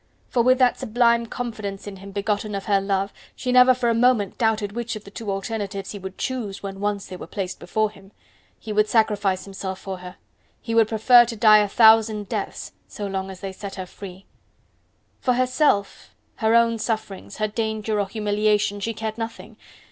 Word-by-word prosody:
For 245 - +2
with 255 +2 +4
that 250 -1 +3
sublime 235 0 +2
confidence 215 -5 -5
in 200 -1 -8
him 195 +1 -11
begotten 205 +1 -2
of 195 - -5
her 200 -2 +2
love, 195 0 -1 0.2
she 250 - -3
never 250 0 +7
for 245 -1 -1
a 230 - +3
moment 230 -4 +2
doubted 220 -3 +1
which 235 +1 -4
of 215 - -8
the 200 - -13
two 215 0 -6
alternatives 200 -1 -4
he 205 - -7
would 190 0 -8
choose, 225 -8 -4
when 195 -1 -6
once 205 -1 -2
they 185 - -8
were - - -9
placed 195 -3 -5
before 215 +4 -1
him. 195 -1 -17 0.5
He 215 - -6
would 210 0 +2
sacrifice 205 -4 +1
himself 190 -1 -5
for 190 -1 -7
her; 180 0 -10 0.4
he 230 - -5
would 225 -1 +5
prefer 240 +2 +6
to 230 0 -5
die 215 0 +7
a 210 - +2
thousand 220 -1 +5
deaths - - -4 0.2
so 205 - -6
long 195 -1 -3
as 190 -1 -10
they 195 - -4
set 195 +1 -8
her 185 - -5
free. 190 0 -11 0.9
For 250 - +1
herself, 255 -5 0 0.2
her 220 0 +2
own 230 -1 +3
sufferings, 215 -3 -4
her 215 0 0
danger 220 0 -2
or 200 - 0
humiliation 210 0 0
she 225 +3 -3
cared 220 +1 -4
nothing! 225 0 -6
210 Hz, 195 wpm, -23 LUFS, 195-230 Hz, 0.9 s, never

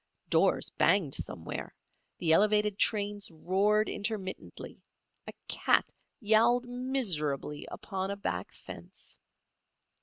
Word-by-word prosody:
Doors - - +2
banged 165 -6 +2
somewhere; 80 -1 -5 0.4
the 160 -2 +3
elevated 210 +2 +3
trains 205 -2 +1
roared 195 +6 +1
intermittently; 200 -3 -6 0.5
a - - -7
cat - - +2 0.3
yowled 235 +3 +3
miserably 195 - -1
upon 190 -1 -5
a 200 - -2
back 200 - -4
fence. - - -12
205 Hz, 95 wpm, -30 LUFS, 180-215 Hz, 0.5 s, the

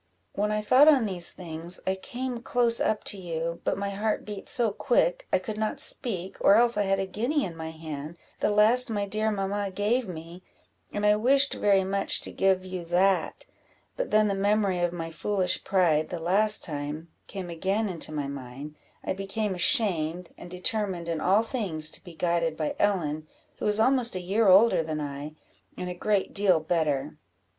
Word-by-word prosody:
"When 210 +1 -1
I 210 0 -1
thought 260 +7 +6
on 280 -7 +5
these 180 -4 -1
things, 170 0 -5
I 190 - +1
came 240 +5 -5
close 240 -2 +1
up 215 - 0
to 200 - -3
you; 170 -1 -4
but - - -1
my 200 0 -3
heart 210 +2 -2
beat 205 -2 -6
so 235 -4 +2
quick, - - 0
I - - +4
could 210 +3 -6
not 220 +6 -2
speak, 195 - 0
or 200 - +6
else 235 +1 +4
I 205 -1 +1
had 195 - +2
a 195 - -1
guinea 240 +10 -1
in 170 -3 -7
my 160 0 -6
hand, 160 0 -8 0.2
the - - +1
last 220 +4 +5
my 205 -2 -1
dear 215 +2 -1
mamma 200 0 -2
gave 210 +5 0
me, 170 0 -9 0.5
and 205 0 -2
I 210 0 +5
wished 275 +5 +3
very 195 -2 +2
much 195 +1 0
to - - -3
give 190 -1 +1
you 185 -1 -6
that; 185 +3 +1 0.5
but - - -3
then 215 0 +3
the 200 - 0
memory 200 -1 +1
of 175 -1 0
my 165 -1 -6
foolish 185 +2 -1
pride, 165 -5 +2
the 175 - -4
last 200 +6 +2
time, 150 +2 -5 0.2
came 185 -3 -6
again 195 +6 -1
into 170 -4 0
my 150 -2 -3
mind 140 +2 -8 0.3
I - - -2
became 195 +2 -3
ashamed, 180 - +2
and 175 - -11
determined 180 -1 -2
in 165 -2 -2
all 200 +5 +3
things 185 - -1
to - - -6
be 175 -3 -12
guided 170 -2 0
by 155 -2 -2
Ellen, 155 -7 0 0.3
who - - -2
is 210 +1 +2
almost 245 -2 +2
a - - -2
year 200 +5 +1
older 195 0 +6
than 155 -1 -4
I, 145 +1 -6 0.4
and 180 0 -4
a - - -4
great 200 +2 -1
deal 195 -4 +3
better." 155 -3 -1
190 Hz, 195 wpm, -27 LUFS, 165-215 Hz, 0.5 s, thought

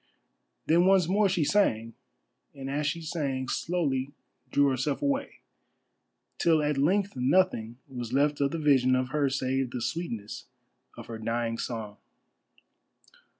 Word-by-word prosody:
Then 170 +3 +4
once 190 -3 +4
more 200 +2 +3
she 180 -4 +1
sang, 115 - +1 0.6
and 135 -1 -6
as 145 +1 -1
she 165 +2 -2
sang, 140 -5 -2
slowly 140 -5 -1 0.4
drew 145 - +3
herself 135 - -1
away, 280 0 -2 1.0
till 160 -3 +3
at 150 -2 0
length 195 +7 +1
nothing 125 -4 +1
was 120 -4 -6
left 145 +2 +1
of 140 - +3
the 165 - -4
vision 135 -4 +3
of 130 0 -1
her 145 0 +1
save 130 -1 -1
the 125 - -5
sweetness 120 -4 -4 0.5
of - - -8
her 115 -1 -7
dying 115 +1 -2
song. 110 -3 -5
140 Hz, 140 wpm, -28 LUFS, 125-165 Hz, 1.0 s, Then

